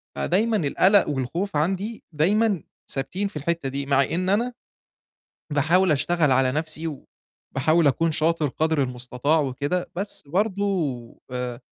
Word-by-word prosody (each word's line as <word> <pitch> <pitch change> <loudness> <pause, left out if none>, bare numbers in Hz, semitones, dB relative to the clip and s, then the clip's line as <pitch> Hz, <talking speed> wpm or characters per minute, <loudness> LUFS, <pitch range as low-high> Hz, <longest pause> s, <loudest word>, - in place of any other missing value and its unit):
فدايمًا 215 +5 +1
القَلَق 190 +4 +3
والخوف 150 +8 -2
عندي 195 +8 -1
دايمًا 200 +3 +2 0.3
ثابتين 160 +10 -2
في 195 - -12
الحتّة 160 -2 -1
دي 140 +1 -3
مع 140 0 +3
إن 185 +5 -1
أنا 235 +5 +1 1.0
باحاول 165 +4 +3
أشتغل 150 0 +2
على 130 0 +3
نَفْسي 155 +1 -2 0.6
وباحاول 155 +4 +2
أكون 160 +4 +2
شاطر 155 -1 +1
قَدر 160 +1 0
المستطاع 125 +4 0
وكده، 145 +6 -2
بس 200 +2 -3
برضه 200 +3 0 0.7
ب 125 -1 -4
160 Hz, 130 wpm, -24 LUFS, 140-190 Hz, 1.0 s, القَلَق